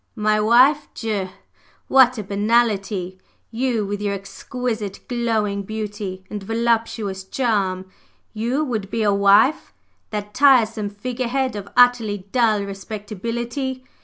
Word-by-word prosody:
"My 215 -1 +1
wife! 255 +7 +4
Dieu! 205 -4 -2 0.6
What 255 -2 +5
a 215 - -3
banalité! 200 -3 0 0.3
You, 235 -2 -1
with 205 +1 -4
your 200 -1 -1
exquisite, 215 +1 -5
glowing 225 -5 -1
beauty 205 -2 -5
and 210 -1 -6
voluptuous 225 -2 -1
charm, 190 -4 -1 0.5
you 240 +7 -1
would 220 -7 -3
be 225 +1 -1
a 205 -1 +3
'wife' 200 +9 +4 0.4
that 210 -1 -5
tiresome 230 -6 +4
figure 240 +5 -4
head 260 -1 -1
of 200 -1 -6
utterly 245 -4 +4
dull 220 -5 +2
respectability? 230 +6 -5
215 Hz, 120 wpm, -21 LUFS, 200-240 Hz, 0.6 s, What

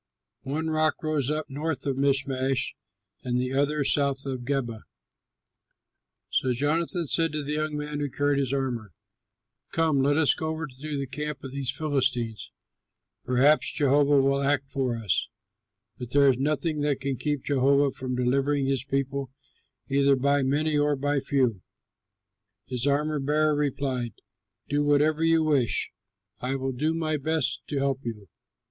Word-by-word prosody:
One 160 +4 -2
rock 155 0 +1
rose 150 -4 0
up 155 0 -2
north 145 0 -3
of 135 -2 0
Michmash, 135 -1 +1 0.5
and 125 -1 0
the 125 +1 -2
other 145 +2 +1
south 140 -1 +1
of 130 -2 -3
Geba. 120 -5 -2 1.5
So 130 -1 +1
Jonathan 165 +6 0
said 165 +2 +1
to 150 -1 -2
the 145 - -4
young 155 0 -1
man 150 0 -4
who 145 -1 -2
carried 145 +1 +1
his 135 -2 0
armor, 125 -8 -2 0.8
"Come, 160 -4 +2
let 145 +2 +2
us 155 -5 +5
go 160 - -4
over 160 +1 -3
to 145 +2 -6
the 140 - -2
camp 150 +2 -5
of 135 - -6
these 135 -2 -3
heathen 155 +3 -3
Philistines. 120 -5 -1 0.7
Perhaps 135 +5 +3
Jehovah 145 0 +4
will 140 +1 +2
act 140 -1 0
for 130 -4 -1
us, 105 -2 0 0.7
for 125 - -5
there 140 +3 +4
is 130 - +2
nothing 150 +2 0
that 145 -2 0
can 135 -1 -2
keep 145 +1 -2
Jehovah 140 0 +3
from 130 -1 -4
delivering 135 +3 +1
his 135 -2 0
people 135 0 -2 0.6
either 140 0 +3
by 140 +2 +2
many 150 +3 +1
or 145 0 +2
by 145 +1 0
few." 130 -7 0 1.0
His 125 +1 -2
armor 150 +2 +1
bearer 150 +2 +2
replied, 135 -5 -1 0.5
"Do 145 +1 +1
whatever 150 +2 +3
you 165 0 +4
wish, 140 -7 +2 0.5
I 130 +2 -2
will 135 0 -2
do 155 +6 -1
my 155 -2 -1
best 155 -1 0
to 145 - -3
help 135 -1 0
you." 105 -5 -6
140 Hz, 160 wpm, -26 LUFS, 130-150 Hz, 1.5 s, us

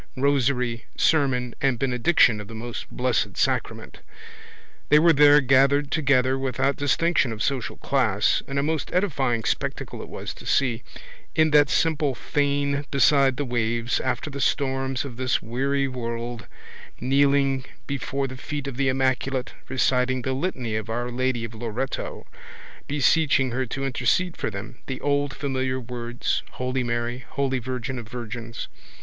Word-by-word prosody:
rosary, 130 -4 +1
sermon 130 -6 +2
and 135 -3 +2
benediction 125 -2 +3
of 105 - -10
the 115 - -9
Most 120 +1 -6
Blessed 125 -2 -1
Sacrament. - - -1 0.9
They 150 - +7
were 165 +2 +6
there 145 +1 +7
gathered 140 +2 +3
together 135 -3 +2
without 135 +1 0
distinction 145 -1 +1
of 110 -1 -3
social 135 -4 -2
class 115 -7 +1
(and 140 - -4
a 140 - +2
most 155 -1 -2
edifying 135 - +1
spectacle - - -3
it - - -9
was - - -6
to - - -12
see) 125 -4 +2 0.5
in 155 -1 +4
that 145 -1 +5
simple 150 -4 +1
fane 140 +1 0
beside 140 -2 +4
the 145 - -1
waves, 120 -1 0
after 130 +3 -2
the 140 0 -5
storms 135 -2 0
of 125 -4 -8
this 130 +1 +1
weary 135 +4 -1
world, 120 -3 -5 0.5
kneeling 135 +1 +2 0.2
before 140 0 -2
the 130 - -8
feet 145 +1 -5
of 135 -3 -5
the 135 -1 +2
immaculate, 130 0 0 0.2
reciting 130 -1 +1
the 130 - -1
litany 130 -7 -2
of 110 0 -3
Our 120 +2 -2
Lady 130 -1 -1
of 115 - -9
Loreto, 120 +4 -4 0.6
beseeching 145 -2 +3
her 130 +1 -1
to 135 +4 -3
intercede 135 +8 +1
for - - -2
them, 110 +4 -8
the 130 - -4
old 145 -1 0
familiar 130 -2 -1
words, 120 -1 -3
holy 125 +1 -2
Mary, 120 +1 -2
holy 135 0 -2
virgin 130 +1 -4
of 115 - -9
virgins. 115 -1 -6
130 Hz, 150 wpm, -24 LUFS, 120-140 Hz, 0.9 s, They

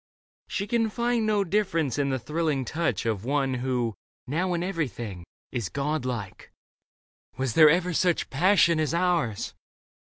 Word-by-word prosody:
She 200 - -2
can 225 0 +1
find 235 0 0
No 210 -2 +2
difference 165 - 0
in 140 -1 +1
the 130 - 0
thrilling 150 +1 -1
touch 160 0 -1
Of 110 -3 -1
one 135 +1 0
who, 125 -2 -1 0.3
now, 175 +6 0
in 170 - -1
everything 120 - -4 0.2
Is 120 -7 -3
God 145 -1 -2
like. 115 -7 -5 0.4
" - - -42
Was 130 -3 -1
there 155 +2 +8
ever 180 +3 +2
such 175 +1 +1
Passion 170 +1 +4
as 155 +1 0
ours 170 - 0
155 Hz, 155 wpm, -26 LUFS, 130-180 Hz, 0.4 s, there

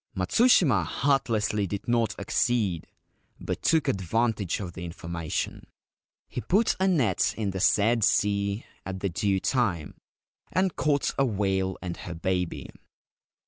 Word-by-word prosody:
Matsushima 125 - +4
heartlessly 110 - 0
did 100 +2 -5
not 120 -3 +1
accede, 100 -4 0 0.5
but - - -4
took 160 -4 +2
advantage 100 +1 0
of 90 -4 -6
the 90 - -7
information. 85 -1 -4 0.6
He 125 - -5
put 205 - +2
a 190 - +2
net 135 - +2
in 105 -3 -1
the 95 - -4
said 110 +4 +3
sea 100 -1 +1 0.2
at 95 -1 -6
the 100 - 0
due 100 +1 0
time, 100 - 0 0.6
and 185 -1 +1
caught 145 -2 +1
a 135 - +4
whale 95 -3 -1
and 90 -1 -4
her 85 - -7
baby. 90 0 -2
100 Hz, 135 wpm, -27 LUFS, 95-120 Hz, 0.6 s, Matsushima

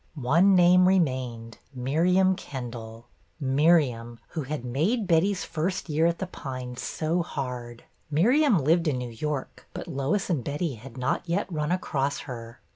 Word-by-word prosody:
One 165 +9 +4
name 180 +1 +6
remained, 130 -10 0 0.2
Miriam 180 +9 +2
Kendall, 120 - -8 0.3
Miriam, 135 -5 +2
who 160 - -4
had 145 -2 -5
made 170 - 0
Betty's 185 +3 +2
first 175 +2 -3
year 155 +2 +3
at 170 0 0
The 190 - -3
Pines 130 -7 -7
so 165 +3 -1
hard. 125 -7 -5 0.3
Miriam 235 - +4
lived 165 +3 +2
in 140 -4 +1
New 125 -1 -5
York, 140 +4 -5
but 180 - -6
Lois 155 +6 -1
and 155 -9 -1
Betty 145 +3 -2
had 120 +2 -11
not 130 +6 -1
yet 185 +4 +1
run 150 +1 -1
across 140 -6 -1
her. 120 -2 -9
150 Hz, 150 wpm, -26 LUFS, 125-175 Hz, 0.3 s, name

